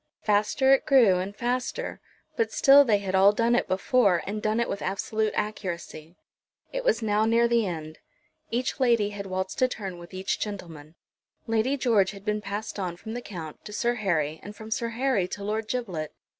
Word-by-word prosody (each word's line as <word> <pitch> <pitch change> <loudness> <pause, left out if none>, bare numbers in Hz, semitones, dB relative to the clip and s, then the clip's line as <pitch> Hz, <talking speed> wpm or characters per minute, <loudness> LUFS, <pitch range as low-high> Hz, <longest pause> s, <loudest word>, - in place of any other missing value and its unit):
Faster 215 +6 +3
it 270 - +2
grew 235 -10 +5
and 195 +2 -4
faster; 250 - -3 0.3
but 455 - 0
still 280 0 +7
they 220 -6 +3
had 195 -2 -4
all 190 +1 +6
done 230 +3 +1
it 240 - +2
before, 195 -2 +2
and 210 +2 -4
done 215 +2 0
it 235 - +1
with 200 - -4
absolute 215 +3 -1
accuracy. 175 -6 -4 0.6
It - - -3
was - - +1
now 215 0 +2
near 230 +1 +3
the 235 -3 +2
end. 155 -3 -6 0.5
Each 245 +4 -2
lady 235 -5 +3
had 200 -1 -6
waltzed 190 +3 -3
a 255 - +5
turn 195 -7 -6
with 175 0 -12
each 190 0 -2
gentleman. 165 -7 -7 0.5
Lady 225 +5 +1
George 225 -7 +3
had 200 0 -12
been 210 0 -1
passed 205 +1 -5
on 180 -3 -3
from 220 +5 -8
the 245 - -4
Count 165 -9 -8
to - - -9
Sir 240 +2 +1
Harry, 160 -9 -1
and 205 +1 -9
from 220 +1 -10
Sir 230 +1 -1
Harry 235 -5 0
to 200 - -6
Lord 215 +2 -2
Giblet. 190 -11 -3
210 Hz, 195 wpm, -26 LUFS, 190-235 Hz, 0.6 s, still